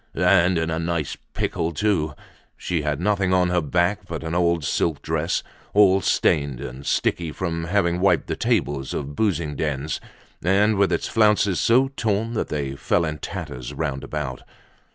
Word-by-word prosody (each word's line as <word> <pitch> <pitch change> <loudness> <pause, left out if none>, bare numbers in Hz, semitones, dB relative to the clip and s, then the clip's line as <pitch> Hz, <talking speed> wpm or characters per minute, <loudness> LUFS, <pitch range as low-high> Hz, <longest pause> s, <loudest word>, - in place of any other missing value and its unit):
And 90 0 +4
in 80 0 -1
a 80 - -1
nice 85 -3 -2 0.2
pickle 85 0 -1
too! 80 -4 0 0.4
She 85 -3 -2
had 75 -1 -1
nothing 95 0 +1
on 90 -1 +3
her 90 -1 +2
back 85 +6 0
but 80 -1 -5
an 80 0 -4
old 85 -3 +1
silk 75 +1 0
dress, 80 +2 -1 0.3
all 95 -2 +6
stained 70 -6 +1
and 65 +2 -7
sticky 85 -3 0
from 85 +1 -3
having 90 -1 +1
wiped 95 0 +3
the - - -3
tables 70 -2 -1
of 70 0 -4
boozing 85 -8 0
dens, 75 +1 -2 0.4
and 100 +4 +3
with 100 -1 +3
its - - 0
flounces 105 -4 +3
so 130 +3 +4
torn 115 -3 -1
that 110 - -1
they 70 -2 -3
fell 85 +4 +1
in 75 -2 -4
tatters 65 +2 -6
round 70 -3 -3
about. 70 -5 -4
85 Hz, 170 wpm, -23 LUFS, 75-95 Hz, 0.4 s, all